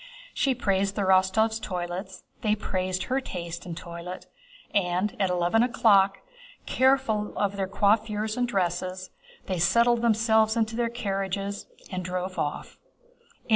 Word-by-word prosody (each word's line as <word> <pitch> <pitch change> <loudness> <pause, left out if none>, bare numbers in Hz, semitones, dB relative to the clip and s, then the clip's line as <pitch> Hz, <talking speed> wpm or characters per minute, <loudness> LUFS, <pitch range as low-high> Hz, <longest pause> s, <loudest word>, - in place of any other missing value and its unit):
She 270 -2 +1
praised 195 -3 0
the 205 - 0
Rostóvs' 190 +4 +3
toilets. 180 0 -5 0.2
They 215 -3 +2
praised 185 -2 -2
her 265 +1 -1
taste 170 -6 -6
and 165 -2 -6
toilet, 170 +1 -8 0.5
and 185 +3 0
at 195 -2 +2
eleven 180 +5 +2
o'clock, 205 -5 +4 0.4
careful 260 -5 +1
of 200 -1 0
their 195 -1 -1
coiffures 210 +2 +1
and 245 0 0
dresses, 185 -2 -2 0.3
they 185 -2 -2
settled 235 +6 +4
themselves 220 -1 +3
in 230 - +4
their 230 +2 -2
carriages 200 -3 -3 0.2
and 185 -1 -3
drove 185 +1 -4
off. 145 - -4
200 Hz, 135 wpm, -26 LUFS, 185-220 Hz, 0.5 s, o'clock